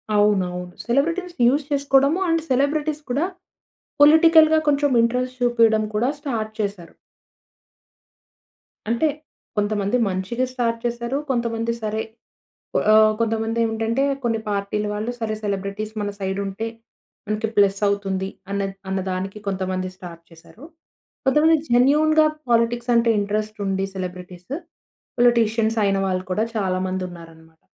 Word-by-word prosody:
అవునవును. 180 -4 +1
Celebrities 335 +8 0
use 280 +3 +2
చేసుకోవడము, 280 +3 +3
and 330 0 +2
celebrities 295 +3 0
కూడా 285 +7 +1 0.8
పొలిటికల్‌గా 315 +1 +7
కొంచెం 285 -1 +2
ఇంట్రెస్ట్ 250 +2 -1
చూపియడం 225 -3 +3
కూడా 235 +5 +1
స్టార్ట్ 230 -7 -3
చేశారు. 200 -5 -4 2.0
అంటే 235 +7 +2 0.5
కొంతమంది 205 +1 0
మంచిగా 190 +7 -2
స్టార్ట్ 235 -2 0
చేసారు. 235 +3 -2
కొంతమంది 235 -2 -1
సరే! 215 +1 -1 0.9
ఆహ్, 215 0 +6
కొంతమంది 225 0 -1
ఏమిటంటే 225 +3 0 0.2
కొన్ని 230 -2 0
పార్టీ‌ల 200 +1 -2
వాళ్ళు 215 +3 -3
సరే 220 -2 -2
సెలబ్రిటీస్ 200 +1 -3
మన 205 - -2
సైడ్ 190 0 -2
ఉంటే 195 +4 -4 0.6
మనకి 215 +1 -1
ప్లస్ 200 -1 +3
అవుతుంది 195 -1 -1 0.2
అన్నద్ 195 -1 -2
అన్నదానికి 190 +1 -3
కొంతమంది 185 -1 -2
స్టార్ట్ 170 -2 -10
చేశారు. 165 - -17 0.6
కొంతమంది 305 +4 +4
జెన్యూన్‌గా 300 +6 +4 0.2
పాలిటిక్స్ 235 +1 +1
అంటే 235 0 +3
ఇంట్రెస్ట్ 215 +1 -2
ఉండి 195 0 0
సెలబ్రిటీస్ 180 +2 -7 0.7
పొలిటీషియన్స్ 230 -2 +3
అయిన 195 0 +2
వాళ్ళు 185 0 -2
కూడా 210 +4 +1
చాలా 185 -3 0
మంది 185 0 -3
ఉన్నారన్నమాట. 160 -1 -14
220 Hz, 115 wpm, -22 LUFS, 195-250 Hz, 2.0 s, పొలిటికల్‌గా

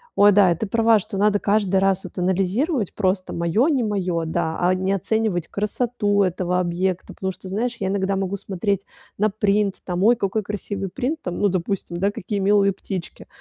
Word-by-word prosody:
Ой, 205 0 +6
да, 190 -3 +5
ты 190 +6 -4
права, 225 +1 +4
что 205 0 -6
надо 205 +1 +3
каждый 200 -2 +1
раз 195 0 +1
вот 185 - -10
анализировать 195 - 0
просто 185 -2 -1
"моё- 170 - +1
не 270 -6 +1
моё", 185 -6 -1
да, 160 0 -1
а 180 +1 +3
не 185 +1 -1
оценивать 195 -3 0
красоту 210 -1 0
этого 180 0 0
объекта, 180 +1 -2
потому 190 0 -3
что, 190 - -11
знаешь, 235 +5 -2
я 190 - -1
иногда 195 0 0
могу 195 0 -2
смотреть 200 0 -2 0.3
на 215 +2 +2
принт, 205 -1 +1
там: 180 0 -1
"Ой, 235 +3 +5
какой 210 0 -1
красивый 200 -1 -4
принт". 270 - -3
Там, 180 -1 -4
ну, 205 - +3
допустим, 185 -1 -2
да: 195 +3 +1
"Какие 205 +1 -4
милые 200 0 +3
птички". 185 -2 -7
195 Hz, 190 wpm, -22 LUFS, 185-210 Hz, 0.3 s, Ой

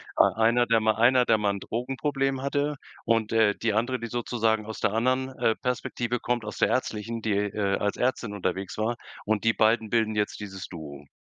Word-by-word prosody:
Ei - - +4
einer 115 +2 +3
der 115 -1 +4
mal 110 0 +2
einer 125 +2 +4
der 110 - +4
mal 105 -1 +1
'n 100 - -5
Drogenproblem 135 +4 -2
hatte 145 +1 0 0.3
und, 115 -2 +1
äh, 110 -3 +3
die 110 -2 0
andere, 120 +3 0
die 115 - -5
sozusagen 115 -2 0
aus 110 - -6
der 105 -1 +1
anderen, 130 +3 +1
äh, 110 - +2
Perspektive 120 -1 -2
kommt, 120 -2 -1
aus 105 - -6
der - - +3
ärztlichen 115 -2 -2
die, 110 - +1
äh, 100 0 0
als 100 0 -1
Ärztin 125 -4 -1
unterwegs 95 -1 -3
war 110 +3 0 0.3
und 110 0 0
die 115 0 +3
beiden 110 0 +2
bilden 110 -1 +1
jetzt 105 0 -1
dieses 95 -3 -7
Duo. 75 -4 -9
110 Hz, 205 wpm, -26 LUFS, 105-120 Hz, 0.3 s, Ei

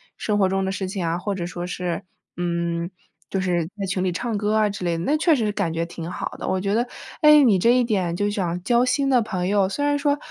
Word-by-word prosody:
生 210 -1 -1
活 195 - +4
中 195 +1 0
的 190 - -1
事 190 0 -3
情 185 -2 -3
啊， 165 +1 0
或 200 +2 -3
者 175 -2 -3
说 175 0 -5
是， 180 -1 -3 0.4
嗯， 170 -1 -1 0.4
就 195 - -1
是 175 -3 0
在 200 - -2
群 185 0 -1
里 185 - +1
唱 225 +4 -2
歌 210 +1 0
啊 215 -1 +3
之 200 -2 -6
类 170 -1 0
的， 165 - -3
那 295 +10 +2
确 320 0 +4
实 235 -5 0
是 210 - 0
感 200 -6 -1
觉 165 +1 -1
挺 170 0 -7
好 - - -4
的。 - - -5
我 190 - 0
觉 195 +2 -1
得， 235 +3 +2 0.4
诶， 300 -1 +8
你 220 -7 +5
这 235 +6 +4
一 250 - +4
点 190 -7 0
就 205 +3 0
想 180 -4 -2
交 240 +4 +3
新 275 +2 +1
的 255 -3 +4
朋 185 -5 -2
友， 195 -1 +2
虽 285 +8 -2
然 290 0 +2
说， 285 0 +1
195 Hz, 290 characters per minute, -23 LUFS, 175-230 Hz, 0.4 s, 诶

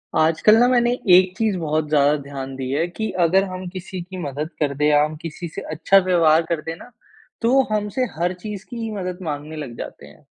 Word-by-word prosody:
आजकल 160 +7 +4
ना 240 +2 +5
मैंने 240 -1 +3 0.2
एक 185 0 +6
चीज़ 215 -4 0
बहुत 155 -1 -1
ज़्यादा 145 0 +4
ध्यान 135 -1 -7
दिया 135 +2 -2
है 170 - 0
कि 220 +5 -4
अगर 190 +4 +4
हम 185 0 -6
किसी 185 0 -7
की 185 +2 -9
मदद 150 -2 -4
कर 145 -2 0
दे 150 - +1
या 150 0 +5
हम 155 +1 -3
किसी 170 +1 -6
से - - -4
अच्छा 180 +5 +3
व्यवहार 165 -3 +4
कर 165 -2 -1
दें 165 +1 -5
ना - - -13 0.5
तो 230 +1 +2
वो 270 - +6
हमसे 210 +4 -1
हर 175 +2 0
चीज़ 195 +1 -8
की 245 - -7
ही 225 -1 -3
मदद 185 -3 -4
माँगने 150 -1 -5
लग 140 -6 -7
जाते - - -8
हैं। - - -19
170 Hz, 225 wpm, -21 LUFS, 150-195 Hz, 0.5 s, एक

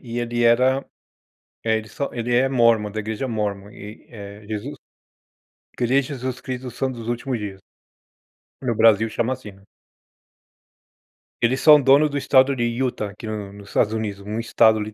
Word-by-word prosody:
e 120 -1 -6
ele 120 0 -1
era 125 +3 +4 0.9
eh, 110 -1 +2
ele 110 0 -9
só 140 +3 -4
ele 120 0 -2
é 130 +2 +3
Mormon, 115 -5 +3
da 110 - -6
igreja 110 +5 -4
Mormon, 105 -3 -3
e, 105 +1 -11
eh, 100 -2 -10
Jesus 105 -1 -5 1.0
Igreja 125 +3 +1
Jesus 130 -1 -5
Cristo 130 -1 -5
do 125 - -5
Santos 130 +1 -3
dos 115 - -7
Últimos 120 +1 -2
Dias. 100 -2 -7 1.0
No 125 -3 -1
Brasil 110 0 +4
chama 120 +3 -1
assim, 130 -5 -9
né. 100 0 -21 1.8
Eles 125 +3 +2
são 150 -2 +8
dono 140 +3 +5
do 145 - -3
Estado 135 0 +3
de 120 - -1
Utah 120 -2 -2
aqui 110 +2 -10
no 105 -2 -5
nos 100 0 -13
Estados 105 - +1
Unidos, 105 -3 -4
um 105 +2 -3
Estado 110 -1 +3
115 Hz, 170 wpm, -22 LUFS, 105-130 Hz, 1.8 s, são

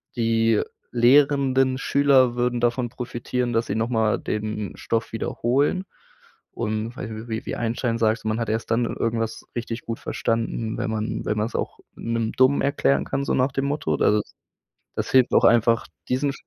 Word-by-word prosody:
Die 115 -2 +2 0.3
lehrenden 135 +1 +4
Schüler 135 -4 +3
würden 120 0 0
davon 120 0 +1
profitieren, 125 0 -3
dass 115 +1 +1
sie - - -2
noch 115 +1 0
mal 110 -3 +1
den 105 -1 -4
Stoff 115 0 -2
wiederholen 140 +10 0 0.7
und 110 +1 -3
weiß 115 - -6
ich, 110 +2 -7
wie 110 0 -3
wie - - -2
Einstein 115 0 -1
sagte, 110 0 +1
man 110 +1 0
hat 115 -2 -2
erst 110 +1 -2
dann 115 +1 +2
irgendwas 115 -1 -2
richtig 120 0 -4
gut 115 -1 -4
verstanden, 115 -1 -2
wenn - - -2
man 110 0 -3
wenn 105 - -1
man's 110 +3 -2
auch - - -3 0.2
'nem 115 -1 -2
Dummen 130 +2 +4
erklären 140 0 +1
kann, 140 +1 -2
so - - 0
nach 130 +2 +2
dem 135 +1 -1
Motto. 140 - -1
Also 105 +7 +3
das - - -19 0.6
das - - -3
hilft 130 -2 +4
auch - - +5
einfach 115 0 +4 0.2
diesen. 140 +2 +1
115 Hz, 175 wpm, -24 LUFS, 115-130 Hz, 0.7 s, auch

